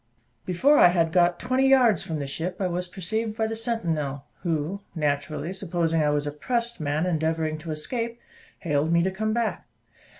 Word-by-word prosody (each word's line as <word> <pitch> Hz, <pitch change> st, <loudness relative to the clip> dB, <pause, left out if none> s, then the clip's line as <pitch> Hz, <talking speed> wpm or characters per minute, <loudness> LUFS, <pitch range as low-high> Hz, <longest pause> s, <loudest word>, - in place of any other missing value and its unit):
Before 265 Hz, +12 st, +4 dB
I -, -, +9 dB
had 170 Hz, -2 st, +2 dB
got 175 Hz, 0 st, +3 dB
twenty 255 Hz, +2 st, +2 dB
yards 255 Hz, -5 st, +5 dB
from 160 Hz, -, -4 dB
the 145 Hz, -, -3 dB
ship, 165 Hz, +6 st, -4 dB
I 195 Hz, -, 0 dB
was 180 Hz, 0 st, -2 dB
perceived 215 Hz, +5 st, -3 dB
by 220 Hz, -, +1 dB
the 225 Hz, 0 st, -2 dB
sentinel, 165 Hz, -, -2 dB, 0.2 s
who, 165 Hz, +3 st, -2 dB
naturally 150 Hz, +2 st, -1 dB
supposing 170 Hz, -4 st, 0 dB
I 150 Hz, -, +2 dB
was 145 Hz, 0 st, 0 dB
a 145 Hz, -, -2 dB
pressed 235 Hz, -, -2 dB
man 150 Hz, +2 st, 0 dB
endeavouring 160 Hz, -2 st, 0 dB
to 160 Hz, +1 st, -9 dB
escape, 230 Hz, +10 st, -3 dB, 0.4 s
hailed 150 Hz, -1 st, 0 dB
me 170 Hz, 0 st, +4 dB
to 190 Hz, -, +1 dB
come 215 Hz, +3 st, -1 dB
back. 230 Hz, 0 st, -1 dB
175 Hz, 185 wpm, -25 LUFS, 155-220 Hz, 0.4 s, I